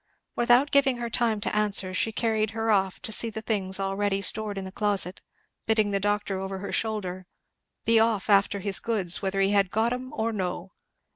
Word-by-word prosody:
Without 245 +4 +3
giving 275 -3 +3
her 235 -1 -5
time 230 -3 +1
to - - -2
answer 200 -3 +1
she 220 +4 +1
carried 220 -1 0
her 225 0 0
off 190 -2 +1
to - - -4
see 230 +2 +2
the 220 0 -7
things 195 -3 -1
already 195 0 -1
stored 205 +1 0
in 195 - -5
the 190 - -8
closet, 200 -3 0 0.5
bidding 215 -2 +2
the 200 - 0
doctor 205 -1 -1
over 190 0 -5
her 195 +1 -6
shoulder 185 -5 -3 0.6
"be 230 0 +4
off 220 -3 +1
after 200 -1 +3
his 200 0 +2
goods, 195 -7 +1
whether 195 0 -1
he 195 +1 +2
had 200 -2 +2
got 225 +4 0
'em 255 +1 -6
or 225 +1 -1
no." 185 -2 -4
205 Hz, 200 wpm, -26 LUFS, 195-225 Hz, 0.6 s, be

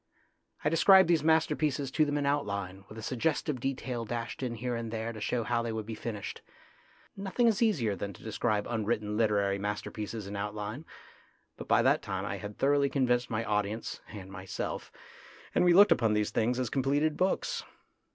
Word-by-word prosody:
I 150 - +3
described 190 +3 +7
these 165 -3 +3
masterpieces 155 -3 +2
to 155 +2 +3
them 145 0 -1
in 145 - 0
outline, 100 -9 -2
with 105 - -10
a 110 - -7
suggestive 135 +3 -1
detail 125 -2 -3
dashed 115 +2 -4
in 125 -3 -2
here 120 +2 -2
and 115 -1 -4
there 115 +1 -3
to 110 - -8
show 115 +3 0
how 120 +1 0
they 115 -1 -3
would 110 -1 -4
be 115 - -5
finished. 105 -2 -5 0.7
Nothing 200 +5 0
is 225 -2 +3
easier 135 - +2
than 100 +2 -4
to - - -15
describe 110 -1 0
unwritten 110 -2 -1
literary 100 -3 +2
masterpieces 105 +1 -4
in 100 +1 -6
outline; 105 +7 -4 0.7
but - - -9
by - - +4
that - - +3
time - - -3
I - - -3
had 105 0 -8
thoroughly 140 0 +3
convinced 125 -3 +1
my 115 +1 -1
audience 105 +1 -2
and 95 -3 -9
myself, 95 -1 -5 0.6
and - - +3
we 175 - +5
looked 200 +4 +7
upon 115 -3 +3
these 105 0 0
things 120 +2 +1
as 125 -3 -2
completed 145 +3 +1
books. 185 +1 0
115 Hz, 185 wpm, -30 LUFS, 105-140 Hz, 0.7 s, described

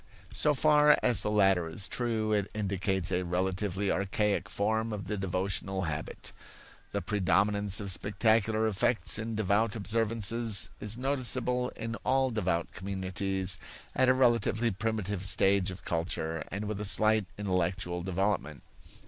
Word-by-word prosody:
So 150 -1 +2
far 150 +1 +5
as 125 -2 +3
the - - -1
latter 95 -5 +3
is 95 +4 -3
true, 110 -3 -1
it 100 -1 0
indicates 95 -2 -1
a 90 0 +1
relatively 95 +2 -1
archaic 100 0 0
form 110 +3 -1
of 100 -3 -5
the 105 - -3
devotional 95 0 -1
habit. 80 -2 -5 0.6
The - - -2
predominance 100 0 +1
of 100 -2 -2
spectacular 110 +3 +2
effects 105 -1 +1
in 110 0 -4
devout 105 +1 +1
observances 110 -3 0
is 105 +2 -2
noticeable 125 -1 0
in 115 0 -4
all 130 0 +1
devout 90 -6 -1
communities 95 0 -2 0.3
at 130 0 +3
a 130 - +5
relatively 120 -2 +2
primitive 105 -2 -2
stage 100 -1 +2
of 95 0 -9
culture 80 -1 -2
and 100 +3 -4
with 105 -1 -4
a - - -3
slight 110 0 +2
intellectual 90 -2 -1
development. 95 -4 -2
100 Hz, 140 wpm, -30 LUFS, 95-110 Hz, 0.6 s, far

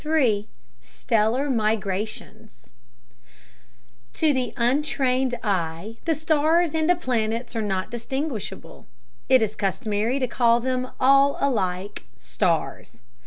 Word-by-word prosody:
III 250 -10 +1 0.3
Stellar 220 - 0
Migrations 215 - -3 1.4
To 310 - +2
the 255 -3 -1
untrained 260 0 +1
eye 185 +1 -2
the 325 -2 +1
stars 315 +2 +2
and 320 +1 0
the 355 - +5
planets 235 -6 -2
are 225 - 0
not 190 -3 -2
distinguishable. 255 0 -5 0.4
It 260 -3 +5
is 215 0 -2
customary 215 +4 -1
to 260 -2 0
call 235 -1 +3
them 255 +1 -2
all 275 +2 +4
alike 200 -6 -1
"stars." - - -2
240 Hz, 110 wpm, -24 LUFS, 215-275 Hz, 1.4 s, the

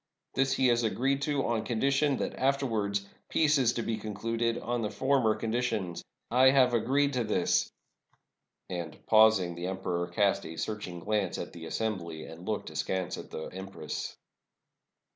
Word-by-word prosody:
This 135 0 +2
he 130 - +2
has 120 0 +3
agreed 135 +5 +1
to, 140 -1 0
on 115 -2 0
condition 135 +5 +1
that - - -2
afterwards 115 -7 0 0.2
peace 150 -2 +3
is 120 -2 +3
to 115 - -2
be 110 0 -1
concluded 115 +2 -1
on 120 0 -2
the 105 - -1
former 130 -5 +2
conditions. 110 -6 -2 0.3
I 130 +2 +7
have 130 -2 +4
agreed 140 +5 +2
to 125 -2 +1
this 105 - +1 0.3
— - - -43
" - - -55
And, 85 -4 -4
pausing, 110 -5 +5
the 85 +1 -4
emperor 90 -2 -2
cast 100 +3 +1
a 80 - -7
searching 95 -5 -4
glance 105 0 0
at - - -6
the 80 -1 -8
assembly, 85 -9 -3
and 80 +2 -11
looked 110 -1 -2
askance 95 -2 -2
at - - -9
the 80 - -6
empress. 95 -4 -6
110 Hz, 165 wpm, -30 LUFS, 95-130 Hz, 0.3 s, I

